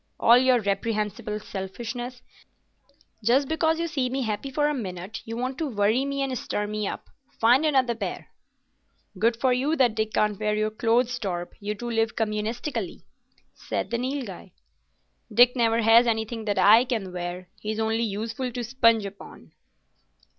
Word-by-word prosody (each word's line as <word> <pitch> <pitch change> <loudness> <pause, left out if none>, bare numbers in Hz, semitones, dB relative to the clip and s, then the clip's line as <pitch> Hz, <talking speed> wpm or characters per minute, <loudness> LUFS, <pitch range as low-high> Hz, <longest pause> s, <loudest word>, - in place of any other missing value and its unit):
"All 235 +2 +7
your 255 -1 +4
reprehensible 210 +1 -2
selfishness. 240 +6 -6 1.0
Just 260 +5 +3
because 320 +1 +1
you 335 - 0
see 275 -6 -1
me 265 +1 -2
happy 220 +4 -3
for 295 +3 +1
a 300 - 0
minute, 195 -4 -5
you 225 +1 -5
want 255 +2 -3
to 320 - -1
worry 220 +3 +1
me 275 0 -1
and 265 -1 -2
stir 210 -3 -2
me 210 -1 -3
up. - - -6 0.3
Find 250 +7 +4
another 260 -5 +2
pair." 225 - -5 0.9
"Good 230 +1 +2
for 255 0 +3
you 275 +6 +1
that 250 -6 +3
Dick 220 0 -2
can't 210 -1 +1
wear 210 -1 0
your 215 0 0
clothes, 240 +3 +1
Torp. 175 -5 -4
You 210 +1 -3
two 240 +3 -5
live 225 -1 0
communistically," 220 - -3 0.5
said - - -4
the 235 - 0
Nilghai. 245 -9 -5 0.8
"Dick 245 +3 +6
never 230 -1 +2
has 230 +2 +6
anything 220 0 -2
that 205 -2 -1
I 210 +5 +7
can 220 -8 -3
wear. 180 0 -5
He's 215 +1 -4
only 225 +1 0
useful 225 +4 -3
to 245 - -3
sponge 230 -3 +3
upon." 200 0 -11
230 Hz, 165 wpm, -25 LUFS, 210-250 Hz, 1.0 s, All